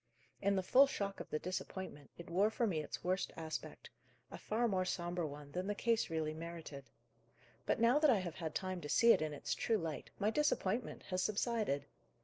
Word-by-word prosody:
In 200 +1 +3
the 190 - +1
full 265 +8 +7
shock 200 -6 -3
of - - -7
the 155 - 0
disappointment, 185 -3 -5
it 170 - -9
wore 190 +5 +3
for 230 +2 0
me 170 -8 0
its 150 - -6
worst 185 +2 0
aspect; 160 -1 -6 0.4
a - - -6
far 235 +3 +1
more 190 -4 +1
sombre 175 -2 -2
one 145 0 -9
than 180 +4 -3
the 205 - -1
case 230 +1 +1
really 160 -1 -1
merited. 160 -4 -7 0.8
But, - - +2
now 235 +5 +5
that 305 -1 +5
I 240 - +6
have 180 -4 -3
had 160 -2 -4
time 185 -2 -2
to 145 - -6
see 235 +7 +6
it - - +1
in 155 -1 -1
its 145 - -3
true 225 - +1
light, 165 -5 -4
my 210 +1 +1
disappointment 240 -6 0
has 185 0 +1
subsided. 210 - 0
185 Hz, 205 wpm, -36 LUFS, 160-215 Hz, 0.8 s, full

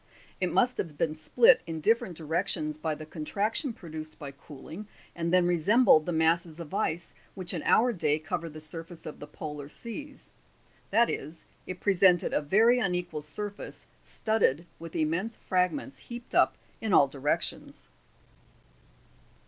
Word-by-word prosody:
It - - 0
must 250 0 +2
have 155 -5 -3
been 155 0 +1
split 460 - +5
in 165 -1 -4
different 190 -2 +1
directions 160 -1 -1
by 155 -1 -1
the 155 - -9
contraction 205 - -2
produced 155 -6 -8
by 145 -3 -7
cooling, 150 +8 -10 0.3
and 170 0 -1
then 180 -1 +5
resembled 175 0 +5
the - - 0
masses 165 0 +1
of 165 -3 -8
ice 170 +3 -1 0.2
which 185 -2 -1
in 170 - -2
our 245 +2 +5
day 155 -6 +1
cover 165 +1 -4
the 155 0 -9
sur 165 +2 -4
face 165 0 -13
of 155 - -7
the 145 - -8
polar 150 -1 -7
seas; 275 - -7 0.6
that 230 +4 +4
is, 160 +2 -5 0.2
it 185 -1 -5
presented 185 -3 +4
a - - +2
very 225 +11 +4
unequal 180 -7 -1
surface, 205 +7 -5 0.2
studded 195 -8 +1
with 165 0 -9
immense 170 +9 0
fragments 185 +10 -1
heaped 240 0 -10
up - - +4 0.3
in 220 -3 -1
all 140 - +7
directions. 140 +2 -3
170 Hz, 155 wpm, -29 LUFS, 155-205 Hz, 0.6 s, all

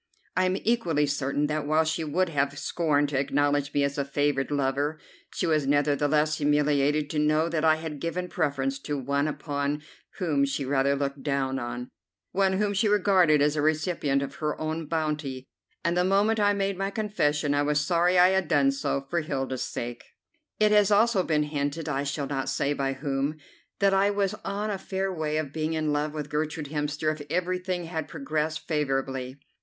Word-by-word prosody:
I 185 - +3
am 185 +1 +1
equally 175 -10 +2
certain 145 0 0
that, 150 0 -2
while 155 +1 +3
she 160 +1 -1
would 170 +4 0
have 140 -2 0
scorned 145 -4 +1
to 135 -2 0
acknowledge 145 +1 +1
me 145 -1 +1
as 140 +1 -1
a - - +2
favoured 140 0 0
lover, 145 +2 0 0.4
she - - 0
was 155 -4 +1
nevertheless 145 +1 +2
humiliated 145 0 +2
to 150 - -1
know 155 +2 +2
that 165 -2 -1
I 160 -1 +5
had 155 -2 -6
given 180 +2 -2
preference 140 -5 -1
to 145 +1 -3
one 140 +2 0
upon 145 -1 -2 0.3
whom 155 -7 +1
she 140 0 -1
rather 140 +1 +2
looked 140 0 -3
down, 130 -3 -2 0.4
one 195 -1 +2
whom 205 +1 +1
she 210 +3 +2
regarded 185 -7 +4
as 150 +1 +2
a 150 - 0
recipient 155 -2 +1
of 140 0 -6
her 150 -1 -2
own 155 0 -3
bounty, 150 -5 -2 0.4
and 170 -1 +1
the 180 - +3
moment 200 +4 +2
I 205 0 +4
made 195 -1 -1
my 195 0 0
confession 150 -9 0
I 145 - +2
was 150 0 +2
sorry 175 +3 +2
I 180 +1 +7
had 190 0 +1
done 275 - +3
so, 205 - -2
for 170 +3 0
Hilda's 135 -4 -3
sake. 120 0 -5 0.6
It 215 0 +4
has 210 -2 +5
also 210 0 +4
been 155 -4 +1
hinted, 150 +1 -3
I 140 -1 -1
shall 140 0 -2
not 135 -1 -2
say 140 - 0
by 135 -1 -1
whom, 140 +2 -2 0.4
that 195 -1 +3
I 195 +1 +4
was 200 -1 0
on 205 +2 -2
a 195 - -3
fair 190 0 -2
way 155 -2 -2
of 145 -3 -3
being 155 0 -1
in 155 -2 0
love 150 +1 0
with 150 -1 -5
Gertrude 150 -1 -2
Hemster 150 +1 -1
if 155 - -9
everything 180 +1 -1
had 160 -2 -4
progressed 150 +2 -3
favourably. 135 -3 -1
150 Hz, 190 wpm, -27 LUFS, 140-175 Hz, 0.6 s, I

